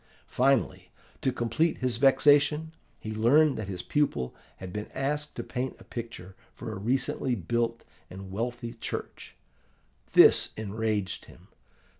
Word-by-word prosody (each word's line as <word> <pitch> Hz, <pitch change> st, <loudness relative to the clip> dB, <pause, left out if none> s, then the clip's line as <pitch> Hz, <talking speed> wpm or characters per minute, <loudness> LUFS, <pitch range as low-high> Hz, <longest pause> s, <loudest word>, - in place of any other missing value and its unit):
Finally, 130 Hz, -1 st, +1 dB, 0.3 s
to 130 Hz, -, +1 dB
complete 125 Hz, +7 st, 0 dB
his 125 Hz, -2 st, 0 dB
vexation, 145 Hz, +3 st, +4 dB, 0.3 s
he 110 Hz, -, -5 dB
learned 135 Hz, +8 st, +4 dB
that 105 Hz, -, -5 dB
his 90 Hz, -2 st, -5 dB
pupil 140 Hz, -, 0 dB, 0.2 s
had 90 Hz, -1 st, -8 dB
been 105 Hz, 0 st, -5 dB
asked 150 Hz, +2 st, -2 dB
to -, -, -4 dB
paint 130 Hz, +1 st, -4 dB
a -, -, -13 dB
picture 110 Hz, -6 st, -8 dB, 0.2 s
for 115 Hz, -, -6 dB
a 95 Hz, -, -6 dB
recently 125 Hz, +3 st, 0 dB
built 115 Hz, +4 st, -2 dB, 0.2 s
and 95 Hz, +1 st, -9 dB
wealthy 120 Hz, +3 st, -4 dB
church. 115 Hz, -, -7 dB, 0.8 s
This -, -, +6 dB
enraged 110 Hz, -1 st, -2 dB
him. -, -, -17 dB
120 Hz, 135 wpm, -28 LUFS, 105-135 Hz, 0.8 s, This